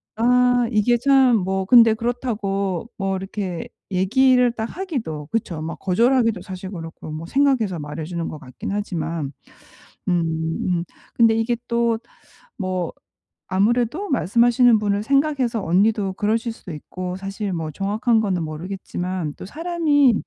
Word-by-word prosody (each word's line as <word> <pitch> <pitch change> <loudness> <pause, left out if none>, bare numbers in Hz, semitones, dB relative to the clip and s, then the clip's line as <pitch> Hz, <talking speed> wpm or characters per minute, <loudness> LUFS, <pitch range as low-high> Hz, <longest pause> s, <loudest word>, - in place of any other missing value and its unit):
아. 250 +2 +4 0.2
이게 235 +2 +3
참 265 -1 +5
뭐 190 0 -1
근데 230 +1 +7
그렇다고 215 -5 -2
뭐 195 -1 -1
이렇게 190 -2 -4 0.2
얘기를 250 +6 +4
딱 225 -1 -4
하기도 230 - -4
그쵸. 190 -8 -2
뭐 160 +1 -4
거절하기도 230 +1 +2
사실 185 0 -7
그렇고 165 -3 -8
뭐 155 +2 -6
생각해서 240 - +1
말해 150 +1 -5
주는 170 +1 -4
것 155 - -7
같긴 125 +6 -7
하지만. 165 -7 -3 0.8
음. 175 -2 +2 0.5
음. 175 -2 +1 0.3
근데 230 -1 +5
이게 225 +2 +1
또 235 -1 +1 0.6
뭐 185 -4 -2 0.6
아무래도 235 - +1
말씀하시는 240 - +4
분을 205 -1 0
생각해서 275 -4 +1
언니도 195 +2 +2
그러실 225 +4 0
수도 190 -5 -10
있고 180 +4 -6
사실 195 +1 -4
뭐 165 -3 -3
정확한 215 - +1
거는 190 -5 0
모르겠지만 175 0 -4
또 - - -8
사람이 305 - +2
205 Hz, 295 characters per minute, -22 LUFS, 180-240 Hz, 0.8 s, 근데